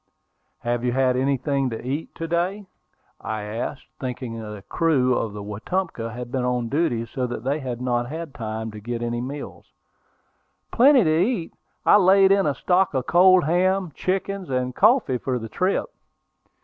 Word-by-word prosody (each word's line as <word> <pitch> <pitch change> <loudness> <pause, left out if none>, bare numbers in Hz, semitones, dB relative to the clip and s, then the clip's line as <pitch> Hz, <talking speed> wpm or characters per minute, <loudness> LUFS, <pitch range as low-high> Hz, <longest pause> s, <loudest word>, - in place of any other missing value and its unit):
"Have 120 0 -1
you 125 -1 0
had 130 -1 +2
anything 135 +1 0
to 115 - -5
eat 140 +6 -4
to 165 - -4
day?" 180 +5 -1 0.5
I 110 -1 -4
asked, 115 +6 -5
thinking 125 -3 -5
the 105 -2 -8
crew 140 -7 +2
of 110 -3 -2
the 105 -1 -7
Wetumpka 115 - -3
had 120 +1 -7
been 130 -1 -1
on 125 -2 -1
duty 135 -6 0
so 125 +2 -3
that 120 -2 -6
they 140 +4 0
had 125 -4 -5
not 120 -1 -1
had 160 -1 -6
time 110 0 -5
to 105 - -9
get 120 +2 -4
any 120 0 -2
meals. 140 +3 -7 1.0
"Plenty 260 0 +6
to 155 -1 +2
eat. 195 -7 -2 0.3
I - - +7
laid 195 0 +5
in 195 -3 +3
a 145 - 0
stock 180 +2 +1
of 130 -1 0
cold 185 +1 +6
ham, 180 +3 +1
chickens, 195 +1 -2
and 125 -1 -1
coffee 150 - +3
for 130 0 -2
the 115 -2 -7
trip." 185 - 0
130 Hz, 175 wpm, -23 LUFS, 120-175 Hz, 1.0 s, I